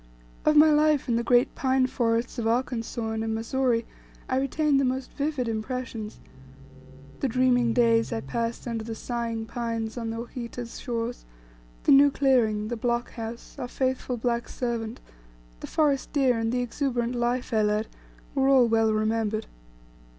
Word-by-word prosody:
Of 305 - +4
my 305 +1 +7
life 300 -1 +3
in 235 - +1
the 235 - +1
great 245 +1 +3
pine 260 -1 +2
forests 235 -1 -1
of 225 - -1
Arkansas, 230 -1 -1
and 220 0 -2
in 220 0 -1
Missouri, 230 0 0 0.4
I 260 - 0
retained 280 +1 +2
the - - +2
most 260 0 -2
vivid 285 -4 -2
impressions. 225 -1 -4 1.0
The 275 - +1
dreaming 245 -1 +3
days 230 -1 +3
I 110 - -2
passed 230 - -3
under 230 -2 -3
the 225 0 -5
sighing 230 -1 -3
pines 230 0 -3
on 230 -1 -3
the 225 - -4
Ouachita's 235 0 -7
shores; 235 -1 -3 0.6
the - - +3
new 280 +1 +8
clearing, 235 -7 +2
the 240 - -2
block 240 +1 -1
house, 230 0 -7
our 250 - -3
faithful 255 -1 -1
black 235 0 -1
servant, 235 -2 -3 0.6
the - - -7
forest 290 -4 +1
deer, 260 -5 +2
and 225 0 0
the 250 0 0
exuberant 245 -1 -1
life 240 +1 -1
I 220 - +3
led, 210 +1 +1 0.5
were 270 -1 +2
all 260 -3 +6
well 225 -1 +3
remembered. 215 0 0
240 Hz, 165 wpm, -26 LUFS, 225-255 Hz, 1.0 s, new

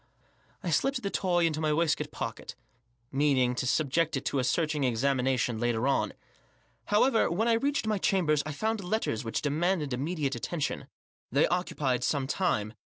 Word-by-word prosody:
I 175 - -2
slipped 255 - +1
the 200 - -2
toy 175 -2 +1
into 155 -1 0
my 155 -1 +1
waistcoat 155 0 +1
pocket, - - -6 0.6
meaning 135 -3 +2
to 125 0 -2
subject 155 +3 +1
it 135 - -6
to 140 - 0
a - - +1
searching 150 +2 0
examination 125 -1 +1
later 120 +1 0
on. 140 - +1 0.7
However, 225 +3 +3
when 210 +7 0
I 235 - +4
reached 275 +3 0
my 215 -2 0
chambers 175 -8 +2
I 155 - -5
found 220 +7 -2
letters 180 - -1
which 115 - -3
demanded 155 0 0
immediate 145 +1 -1
attentioa 160 -1 -3 0.4
They 140 +5 +4
ooeupied 145 -8 -1
some 135 +2 0
time. 130 - 0
150 Hz, 160 wpm, -29 LUFS, 130-180 Hz, 0.7 s, I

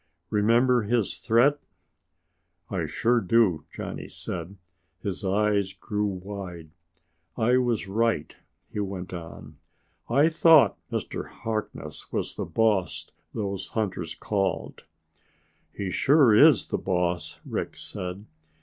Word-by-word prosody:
"Remember 120 +4 +4
his 110 0 0
threat?" 125 +5 +3 1.1
"I 85 -5 -1
sure 120 +9 +2
do!" 95 -6 +2
Johnny - - -6
said. 85 +4 -6 0.5
His 100 +1 -4
eyes 100 0 +1
grew 105 +2 -2
wide. 90 -4 -7 0.7
"I 120 +3 +3
was 120 -5 0
right," 115 +4 0 0.4
he - - -3
went 95 -2 -4
on. 85 -2 -9 0.5
"I 140 +6 +5
thought 160 -2 +5
Mr. - - -3
Harkness 110 -2 -5
was - - -2
the - - -4
boss 105 -5 0 0.2
those 100 -3 -3
hunters 95 -7 -3
called." 95 -4 -2 0.9
"He 95 -2 -4
sure 135 - +5
is 140 +3 +7
the - - -1
boss," 90 -3 -1
Rick - - -4
said. 90 +3 -6
105 Hz, 115 wpm, -26 LUFS, 95-115 Hz, 1.1 s, is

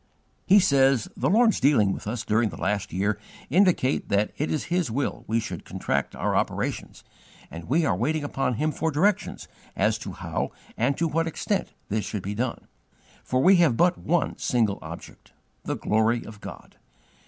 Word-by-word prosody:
He 200 +2 +7
says: 135 - +3
"The - - 0
Lord's 225 +2 +4
dealings 120 -8 +4
with - - -7
us 115 +1 -3
during 110 +1 +2
the - - -9
last 105 -1 -1
year 100 +4 0 0.3
indicate 175 -6 +2
that 100 +1 +1
it 150 - -2
is 155 - -1
His 175 -4 -1
will 135 +5 -2
we 115 +1 +1
should - - -6
contract 70 +1 -2
our - - -1
operations, - - -2 0.5
and 80 0 -8
we 155 +6 +2
are - - +2
waiting 155 0 -1
upon 135 -3 -1
Him 155 +7 0
for 160 +2 -1
directions 180 +7 0 0.3
as - - +1
to - - -7
how - - -4 0.2
and 130 +4 +1
to 165 - +1
what 165 +2 0
extent 190 +4 -2 0.2
this 105 0 -1
should 100 -1 -4
be 100 - -3
done; 115 +3 -3 0.6
for 130 0 0
we 190 +1 +7
have 160 -9 +3
but 175 +1 +4
one 175 +1 -1
single 110 -5 +1
object 80 +1 -11 0.3
the - - -1
glory 110 +2 +1
of 105 -2 -11
God. - - -10
130 Hz, 180 wpm, -25 LUFS, 105-165 Hz, 0.6 s, He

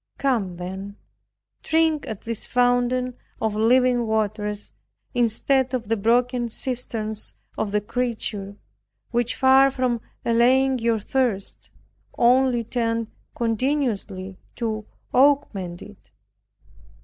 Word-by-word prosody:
Come 225 -10 0
then, 190 +3 -6 0.7
drink 320 -2 +1
at 215 -3 -6
this 230 -2 -5
fountain 245 0 +2 0.3
of 220 -1 0
living 245 +2 +3
waters, 210 -1 -2 0.4
instead 250 +2 +2
of 230 -4 -5
the 225 - +3
broken 240 +3 +1
cisterns 225 -3 -1 0.2
of 210 - -2
the 210 0 +1
creature, 215 -3 -3 0.6
which 240 0 0
far 265 +1 +6
from 255 -3 -1 0.2
allaying 255 +3 +3
your 230 -1 +1
thirst, 220 -2 -1 0.5
only 245 0 +4
tend 230 -1 -2 0.2
continually 225 -6 -1 0.2
to 220 -3 -3 0.3
augment 235 -11 +2
it. - - -15
235 Hz, 100 wpm, -23 LUFS, 215-255 Hz, 0.7 s, far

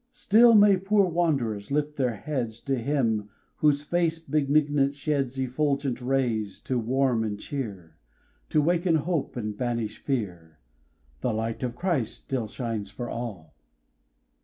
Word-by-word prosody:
Still 235 -1 +5
may 205 -2 +7
poor 200 +2 +3
wand'rers 140 - 0
lift 150 +1 -1
their 125 -5 0
heads 120 -2 -3
To 135 - -1
Him, 115 -5 0 0.3
whose 145 -1 +3
face 165 +1 +1
benignant 145 -2 +1
sheds 140 -3 -1
Effulgent 135 0 -1
rays, 120 -6 0
to 130 -2 -1
warm 125 0 +1
and 105 -2 -3
cheer, 100 - -6 0.5
To 150 - +3
waken 170 +1 +2
hope, 160 0 -1
and 105 -3 -3
banish 115 -2 -2
fear; 90 - -4 0.6
"The - - 0
light 115 +1 -3
of 125 -2 -3
Christ 150 - -1
still 125 -5 -2
shines 110 -3 -4
for 120 +4 -6
all!" 100 -11 -6
130 Hz, 135 wpm, -27 LUFS, 110-150 Hz, 0.6 s, may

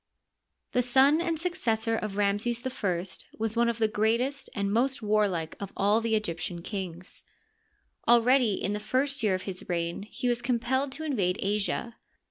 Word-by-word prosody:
The 250 - +2
son 265 +6 +5
and 335 -2 -1
successor 235 -11 0
of 215 -2 -3
Ramses 210 +5 0
I 190 -9 -1 0.3
was 225 0 -2
one 235 0 +3
of 235 - -2
the 225 -1 +3
greatest 235 +6 0
and 200 -1 0
most 260 +2 +1
warlike 205 -6 +1
of 200 -1 -6
all 205 +3 +3
the 225 -1 +1
Egyptian 170 -4 -3
kings. 185 -3 -6 0.8
Al 235 0 +6
ready 250 -3 +4
in 200 - -2
the 210 - -2
first 265 +6 0
year 210 -4 +2
of 185 - -5
his 185 -2 -5
reign 170 0 -1
he 250 - -3
was 240 0 +1
compelled 255 +3 0
to 315 - -7
in 300 -3 -1
vade 180 -3 +1
Asia. 210 +3 -1
225 Hz, 175 wpm, -28 LUFS, 200-250 Hz, 0.8 s, Al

